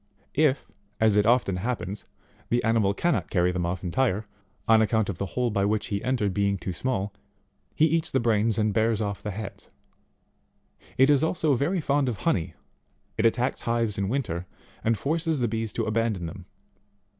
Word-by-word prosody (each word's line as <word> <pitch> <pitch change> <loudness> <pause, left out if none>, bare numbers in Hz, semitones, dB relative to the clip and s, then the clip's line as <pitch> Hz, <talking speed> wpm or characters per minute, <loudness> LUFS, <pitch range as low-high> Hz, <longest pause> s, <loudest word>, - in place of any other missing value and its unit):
If, 150 -3 +2 0.3
as 110 -2 +4
it 105 +1 +3
often 115 -6 +3
hap 120 +6 -1
pens, 100 +1 -5 0.4
the 120 +1 +1
animal 110 -3 +2
cannot 175 +8 0
carry 90 -2 +2
them 90 -1 -1
off 90 +1 -3
entire, 105 +3 0 0.4
on 110 -1 +6
account 110 -1 +1
of 100 - -4
the 100 - -2
hole 125 -2 +1
by 100 -2 +1
which 105 +1 0
he 100 - -2
entered, 120 -6 0
being 100 0 +1
too 90 0 -5
small, 105 -1 -2 0.6
he 155 - +4
eats 160 0 +1
the 130 - +1
brains 115 -2 +2
and 105 -1 +1
bears 110 0 +2
off 100 -2 -3
the 105 - -4
heads. 105 +1 -7 1.3
It 135 +3 +6
is 145 0 +3
also 160 -2 +1
very 160 +8 0
fond 140 -2 +1
of 115 - -3
honey; 90 -3 -1 0.6
it 110 - +4
attacks 120 +3 0
hives 115 -3 0
in 100 -1 -1
winter, 95 -9 -2 0.4
and 115 0 +2
forces 160 - 0
the 120 - +1
bees 110 0 -2
to - - -1
abandon 110 -4 0
them. 80 - -8
110 Hz, 185 wpm, -26 LUFS, 100-125 Hz, 1.3 s, on